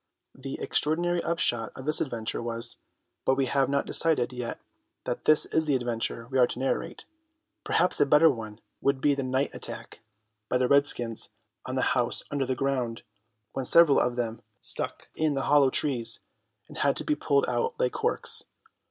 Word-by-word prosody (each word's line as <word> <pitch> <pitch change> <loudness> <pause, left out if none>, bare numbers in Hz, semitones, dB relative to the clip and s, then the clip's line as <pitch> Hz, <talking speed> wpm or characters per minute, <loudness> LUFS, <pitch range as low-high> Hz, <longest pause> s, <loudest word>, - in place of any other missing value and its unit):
The 135 0 -8
extraordinary 175 +3 0
upshot 120 -9 -1
of 130 - -9
this 155 +1 +5
adventure 115 -6 -3
was—but 120 +2 -2
we 135 0 0
have 135 +1 0
not 140 0 0
decided 150 -7 +2
yet 125 -1 -5 0.4
that 125 - -5
this 155 - +5
is 160 -1 0
the 145 - +2
adventure 115 -1 -3
we 130 - +1
are 125 - +5
to - - -7
narrate. 135 +1 -3 0.6
Perhaps 180 - +3
a 145 - +4
better 150 +3 +6
one 110 -3 -8 0.2
would 140 -1 +1
be 145 +2 +2
the 140 - -2
night 130 +2 -1
attack - - -9 0.5
by 125 - +2
the 125 0 +1
redskins 125 -5 +3 0.4
on 130 - -4
the 130 - 0
house 120 -1 +1
under 140 -2 -1
the 130 - -1
ground, 125 -3 -2 0.5
when 135 - -3
several 170 0 +6
of 125 0 0
them 115 -2 -4 0.2
stuck - - -3
in 155 -2 0
the 135 - -2
hollow 145 -2 +4
trees 130 -4 +1 0.5
and - - -10
had - - +2
to - - -4
be 305 - 0
pulled 140 - +1
out 120 -1 -2
like 125 - +1
corks. - - +1
130 Hz, 180 wpm, -27 LUFS, 120-145 Hz, 0.6 s, better